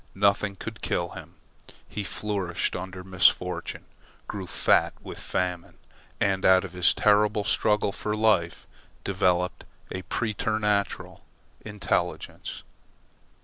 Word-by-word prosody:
Nothing 100 0 +2
could 110 +3 -7
kill 85 0 -1
him. - - -10 0.5
He 105 - -4
flourished 95 -2 -2
under 95 0 -6
misfortune, 95 -1 +2 0.4
grew 95 -3 -5
fat - - +2
with - - -8
famine, 90 -2 -3 0.4
and 95 -1 +1
out 95 0 +6
of 95 -2 -7
his 90 -1 +3
terrible 105 0 +3
struggle 105 -1 +2
for 105 +2 -3
life 105 -6 +2 0.4
developed 90 -2 +1 0.3
a 95 - -3
preternatural 105 0 -1 0.4
intelligence. 105 -4 -3
100 Hz, 105 wpm, -27 LUFS, 90-105 Hz, 0.5 s, out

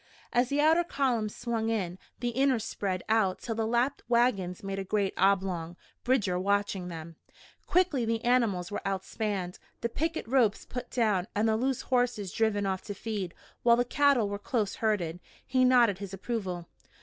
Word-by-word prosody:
As 245 +1 +3
the 285 - 0
outer 320 +3 +5
columns 245 -9 0
swung 230 -2 -2
in, 190 -5 -2 0.2
the 240 - 0
inner 265 +2 +2
spread 195 -4 -3
out 215 -4 +2
till 235 - -4
the 220 0 -1
lapped 240 +4 +1
wagons 210 -7 +1
made 195 0 -3
a - - -2
great 200 0 0
oblong, 185 -3 +1 0.3
Bridger 210 -8 +1
watching 200 -1 0
them. 165 -1 -8 0.5
Quickly 345 -8 +2
the 225 0 -1
animals 225 -8 +2
were - - -3
outspanned, 195 -1 -3 0.2
the 235 - -1
picket 320 +5 -2
ropes 235 -4 +2
put 250 -1 -6
down 210 -6 +1
and 210 +2 +2
the 220 - +3
loose 260 +2 0
horses 245 -7 0
driven 215 -2 +1
off 190 -1 -1
to 205 - -5
feed 200 -4 -4 0.3
while 235 -1 +6
the 245 - +2
cattle 280 -4 +3
were 200 0 -4
close 215 -2 -1
herded. 180 -7 0 0.3
He 255 -1 +2
nodded 240 -6 +5
his 195 -1 -6
approval. 190 -5 -4
220 Hz, 175 wpm, -29 LUFS, 195-245 Hz, 0.5 s, while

